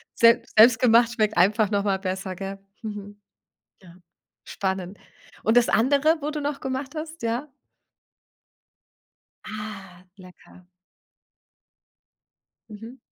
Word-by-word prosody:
Selbst 230 Hz, 0 st, +4 dB
selbstgemacht 235 Hz, +1 st, +6 dB
schmeckt 215 Hz, -3 st, 0 dB
einfach 205 Hz, +3 st, +3 dB
noch 200 Hz, -1 st, 0 dB
mal 195 Hz, -2 st, 0 dB
besser, 190 Hz, 0 st, -4 dB
gell? 195 Hz, +1 st, -6 dB, 0.2 s
Mhm, 205 Hz, -1 st, -8 dB, 0.6 s
ja, 175 Hz, -2 st, -16 dB, 0.5 s
spannend. 190 Hz, 0 st, -4 dB, 0.5 s
Und 225 Hz, +3 st, +3 dB
das 240 Hz, -, +4 dB
andere, 285 Hz, +7 st, +2 dB
wo 300 Hz, +2 st, -3 dB
du 300 Hz, -, -4 dB
noch 290 Hz, -1 st, -4 dB
gemacht 265 Hz, +2 st, -4 dB
hast, 315 Hz, +1 st, -7 dB
ja? 240 Hz, +5 st, -3 dB, 1.9 s
Ah, 195 Hz, -4 st, -9 dB
lecker. 180 Hz, -1 st, -17 dB, 2.0 s
Mhm. 225 Hz, +5 st, -11 dB
215 Hz, 105 wpm, -24 LUFS, 195-255 Hz, 2.0 s, selbstgemacht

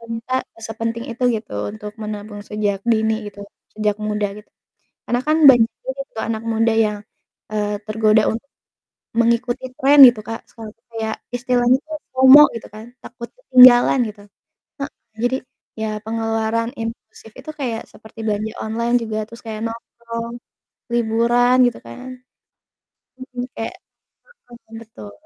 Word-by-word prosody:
Ternyata 230 Hz, +2 st, -5 dB, 0.3 s
sepenting 230 Hz, +1 st, -4 dB
itu 235 Hz, +2 st, -7 dB
gitu 215 Hz, -, -9 dB, 0.2 s
untuk 210 Hz, -1 st, -8 dB
menabung 210 Hz, -1 st, -6 dB
sejak 210 Hz, -2 st, -2 dB
dini 220 Hz, -1 st, +2 dB
gitu, 205 Hz, 0 st, -10 dB, 0.3 s
sejak 210 Hz, -1 st, 0 dB
muda 210 Hz, -1 st, -1 dB
gitu 210 Hz, -, -13 dB, 0.5 s
karena 245 Hz, -, -1 dB
kan 310 Hz, -, +3 dB, 0.2 s
banyak 240 Hz, -3 st, +5 dB, 0.2 s
juga -, -, -5 dB
tuh -, -, -4 dB
anak 220 Hz, 0 st, -3 dB
muda 225 Hz, 0 st, +2 dB
yang, 210 Hz, 0 st, -4 dB, 0.5 s
eee, 210 Hz, -1 st, -1 dB
tergoda 215 Hz, 0 st, +3 dB
untuk 230 Hz, +5 st, -6 dB, 0.7 s
mengikuti 235 Hz, +2 st, +1 dB
trend 280 Hz, +2 st, +6 dB
gitu, 230 Hz, -3 st, -5 dB
Kak, 225 Hz, 0 st, -6 dB
sekarang 220 Hz, -2 st, -10 dB, 0.2 s
kayak 220 Hz, -1 st, -3 dB, 0.2 s
istilahnya 245 Hz, 0 st, +2 dB
itu 310 Hz, +3 st, -19 dB, 0.2 s
FOMO 260 Hz, +2 st, +9 dB, 0.2 s
gitu -, -, -11 dB
kan 215 Hz, +1 st, -10 dB, 0.2 s
takut 235 Hz, -1 st, -9 dB
ketinggalan 255 Hz, -, +7 dB
gitu. 210 Hz, -1 st, -12 dB, 0.6 s
Heeh, 275 Hz, -, -4 dB, 0.3 s
jadi 250 Hz, +2 st, +1 dB, 0.4 s
ya 220 Hz, -, -1 dB, 0.2 s
pengeluaran 225 Hz, +1 st, -1 dB
impulsif 225 Hz, -1 st, -8 dB
itu -, -, -13 dB
kayak 235 Hz, -4 st, -2 dB
seperti 220 Hz, +1 st, -17 dB
belanja 215 Hz, +1 st, -2 dB
online 235 Hz, +2 st, -1 dB
juga 220 Hz, -1 st, -4 dB
terus 230 Hz, +1 st, -13 dB
kayak 215 Hz, -1 st, -5 dB
nongkrong 230 Hz, 0 st, -8 dB, 0.6 s
liburan 235 Hz, +2 st, +2 dB
gitu 245 Hz, -, -2 dB
kan. 120 Hz, -, -10 dB, 1.1 s
Mhm, 255 Hz, -1 st, -7 dB
kayak 225 Hz, -, -5 dB, 0.8 s
heeh, 235 Hz, -1 st, -15 dB
betul. 110 Hz, -, -12 dB
225 Hz, 140 wpm, -20 LUFS, 215-240 Hz, 1.1 s, FOMO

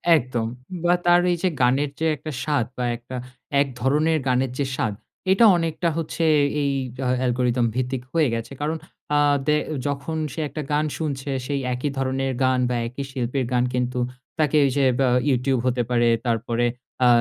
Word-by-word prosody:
একদম। 120 Hz, -5 st, -1 dB, 0.4 s
বা 175 Hz, -, +4 dB
তার 175 Hz, 0 st, +6 dB
এই 175 Hz, -, +1 dB
যে 185 Hz, -, +4 dB
গানের 135 Hz, +4 st, +3 dB
যে 160 Hz, -, 0 dB
একটা 155 Hz, +1 st, -7 dB
স্বাদ 145 Hz, -5 st, +1 dB
বা 125 Hz, -, -1 dB
একটা 120 Hz, +2 st, -9 dB, 0.5 s
এক 145 Hz, -, +1 dB
ধরনের 150 Hz, +5 st, +2 dB
গানের 130 Hz, 0 st, +1 dB
যে 140 Hz, -, +1 dB
স্বাদ 110 Hz, -5 st, -1 dB, 0.4 s
এটা 210 Hz, +4 st, +6 dB
অনেকটা 165 Hz, 0 st, 0 dB
হচ্ছে 165 Hz, +1 st, -2 dB, 0.4 s
এই 140 Hz, -1 st, +1 dB, 0.3 s
হ 125 Hz, -, +1 dB
অ্যালগরিদম 125 Hz, -1 st, +1 dB
ভিত্তিক 130 Hz, 0 st, -1 dB
হয়ে 160 Hz, -3 st, +3 dB
গেছে। 115 Hz, +2 st, -4 dB
কারণ 155 Hz, +2 st, -1 dB, 0.4 s
আ -, -, +4 dB, 0.3 s
দে 150 Hz, -, +4 dB, 0.3 s
যখন 145 Hz, +3 st, -3 dB, 0.2 s
সে -, -, -6 dB
একটা 155 Hz, -, -5 dB
গান 150 Hz, +1 st, +2 dB
শুনছে 145 Hz, -3 st, -3 dB, 0.2 s
সেই 140 Hz, 0 st, -1 dB
একই 125 Hz, +4 st, -2 dB
ধরনের 135 Hz, 0 st, 0 dB
গান 130 Hz, 0 st, +3 dB
বা 125 Hz, -, 0 dB
একই 125 Hz, +4 st, -5 dB
শিল্পীর 130 Hz, 0 st, -1 dB
গান 125 Hz, 0 st, +3 dB
কিন্তু 125 Hz, 0 st, -1 dB, 0.4 s
তাকে 155 Hz, -1 st, +3 dB, 0.2 s
যে 140 Hz, -2 st, +3 dB
বা 135 Hz, -, +4 dB, 0.2 s
Youtube 130 Hz, -1 st, +1 dB
হতে 125 Hz, -1 st, +1 dB
পারে 120 Hz, -1 st, +3 dB, 0.2 s
তারপরে 115 Hz, 0 st, 0 dB, 0.4 s
আ -, -, +7 dB
135 Hz, 175 wpm, -23 LUFS, 125-150 Hz, 0.5 s, আ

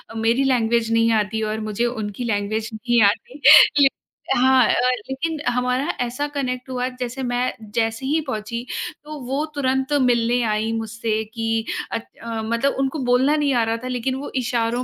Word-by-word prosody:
मेरी 230 Hz, +4 st, +2 dB
लैंग्वेज 235 Hz, -3 st, +1 dB
नहीं 230 Hz, 0 st, +3 dB
आती 220 Hz, +2 st, -3 dB
और 220 Hz, -, -3 dB
मुझे 225 Hz, +3 st, 0 dB
उनकी 220 Hz, -1 st, -4 dB
लैंग्वेज 215 Hz, 0 st, -1 dB
नहीं 240 Hz, +1 st, +1 dB
आती। 230 Hz, +7 st, 0 dB, 0.4 s
ले 275 Hz, -, +8 dB, 0.5 s
हाँ, 260 Hz, -1 st, +5 dB, 0.4 s
लेकिन 310 Hz, +4 st, -3 dB
हमारा 250 Hz, +2 st, 0 dB
ऐसा 245 Hz, +4 st, -2 dB
कनेक्ट 255 Hz, -2 st, -3 dB
हुआ 250 Hz, -1 st, -1 dB
जैसे 255 Hz, +1 st, -4 dB
मैं 245 Hz, +1 st, -1 dB, 0.2 s
जैसे 225 Hz, +2 st, -1 dB
ही 300 Hz, +4 st, +1 dB
पहुँची 235 Hz, 0 st, -4 dB, 0.4 s
तो 305 Hz, 0 st, -8 dB
वो 270 Hz, +5 st, -2 dB
तुरंत 265 Hz, -1 st, 0 dB
मिलने 240 Hz, -1 st, +2 dB
आई 215 Hz, +1 st, -1 dB
मुझसे 225 Hz, 0 st, -2 dB
कि 225 Hz, -1 st, -1 dB, 0.3 s
अच 230 Hz, -, -3 dB, 0.2 s
मतलब 230 Hz, +4 st, -1 dB
उनको 270 Hz, +3 st, -1 dB
बोलना 255 Hz, +4 st, +3 dB
नहीं 290 Hz, -2 st, +1 dB
आ 240 Hz, -2 st, +2 dB
रहा 225 Hz, 0 st, -1 dB
था 255 Hz, -, -4 dB
लेकिन 255 Hz, +1 st, -2 dB
वो 280 Hz, +2 st, -6 dB
इशारों 240 Hz, 0 st, -1 dB
240 Hz, 160 wpm, -22 LUFS, 225-260 Hz, 0.5 s, ले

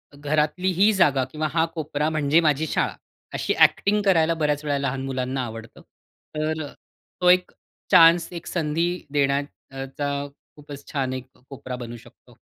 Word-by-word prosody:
घरातली 150 Hz, +5 st, 0 dB
ही 210 Hz, +2 st, +6 dB
जागा 140 Hz, -8 st, +3 dB
किंवा 155 Hz, 0 st, -2 dB
हा 165 Hz, -1 st, +3 dB
कोपरा 150 Hz, -1 st, -1 dB
म्हणजे 155 Hz, 0 st, +2 dB
माझी 155 Hz, 0 st, +1 dB
शाळा, -, -, -1 dB, 0.4 s
अशी -, -, -1 dB
ॲक्टिंग 210 Hz, +1 st, +4 dB
करायला 165 Hz, -4 st, +3 dB
बऱ्याच 150 Hz, 0 st, 0 dB
वेळा 145 Hz, -1 st, 0 dB
लहान 135 Hz, -1 st, -2 dB
मुलांना 130 Hz, 0 st, -2 dB
आवडतं. 115 Hz, -1 st, -10 dB, 0.5 s
तर 155 Hz, 0 st, -2 dB, 0.6 s
तो 180 Hz, -, +5 dB
एक 180 Hz, 0 st, +4 dB, 0.4 s
चान्स, 165 Hz, 0 st, +7 dB
एक 170 Hz, -1 st, -7 dB
संधी 165 Hz, 0 st, 0 dB, 0.2 s
देण्याचा 140 Hz, -1 st, -2 dB
अ, -, -, -6 dB, 0.3 s
खूपच 145 Hz, -1 st, -11 dB
छान 135 Hz, -3 st, -1 dB
एक 130 Hz, 0 st, -6 dB, 0.2 s
कोपरा 130 Hz, -2 st, -7 dB
बनू 120 Hz, -1 st, -7 dB
शकतो. -, -, -19 dB
150 Hz, 150 wpm, -24 LUFS, 135-160 Hz, 0.6 s, चान्स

